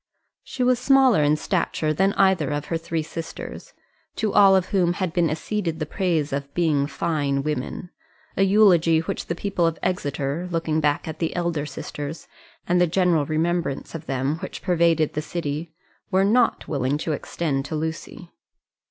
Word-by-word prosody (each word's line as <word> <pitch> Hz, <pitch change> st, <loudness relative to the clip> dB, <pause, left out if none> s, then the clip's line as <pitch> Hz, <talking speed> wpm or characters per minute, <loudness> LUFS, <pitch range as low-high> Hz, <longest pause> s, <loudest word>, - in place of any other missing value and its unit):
She 255 Hz, -, -3 dB
was 250 Hz, -1 st, +3 dB
smaller 265 Hz, -, +5 dB
in 150 Hz, +1 st, +3 dB
stature 160 Hz, -3 st, -1 dB
than 195 Hz, +5 st, +2 dB
either 190 Hz, -7 st, +3 dB
of 145 Hz, 0 st, -2 dB
her -, -, +2 dB
three 165 Hz, -1 st, -3 dB
sisters, 165 Hz, -, -8 dB, 0.4 s
to 215 Hz, -2 st, -1 dB
all 195 Hz, -2 st, +7 dB
of 185 Hz, -1 st, +1 dB
whom 180 Hz, -3 st, +2 dB
had 180 Hz, -2 st, -3 dB
been 175 Hz, -3 st, +2 dB
acceded 165 Hz, +2 st, -2 dB
the 155 Hz, -, -3 dB
praise 160 Hz, -3 st, -1 dB
of 140 Hz, 0 st, -3 dB
being 150 Hz, -5 st, +2 dB
fine 140 Hz, -2 st, -1 dB
women 150 Hz, +4 st, -4 dB, 0.4 s
a -, -, 0 dB
eulogy 185 Hz, -5 st, +5 dB
which 165 Hz, -, -4 dB
the 170 Hz, -, -2 dB
people 185 Hz, -2 st, 0 dB
of 165 Hz, -, -2 dB
Exeter, 145 Hz, -1 st, -2 dB
looking 165 Hz, -2 st, 0 dB
back 145 Hz, 0 st, 0 dB
at 160 Hz, -, -6 dB
the 165 Hz, -, -2 dB
elder 170 Hz, -4 st, -1 dB
sisters, 145 Hz, +2 st, -7 dB, 0.4 s
and 180 Hz, 0 st, +3 dB
the 180 Hz, -, +4 dB
general 170 Hz, -4 st, +2 dB
remembrance 165 Hz, -2 st, -1 dB
of 165 Hz, -1 st, -7 dB
them 135 Hz, +3 st, -1 dB
which -, -, -7 dB
pervaded 170 Hz, -4 st, +2 dB
the 150 Hz, -, -2 dB
city, 155 Hz, 0 st, -4 dB, 0.4 s
were 190 Hz, -1 st, +3 dB
not 235 Hz, +4 st, +2 dB
willing 140 Hz, -1 st, 0 dB
to 155 Hz, -, -3 dB
extend 145 Hz, -2 st, -2 dB
to 155 Hz, -, -4 dB
Lucy. 160 Hz, +2 st, -5 dB
165 Hz, 170 wpm, -23 LUFS, 150-180 Hz, 0.4 s, all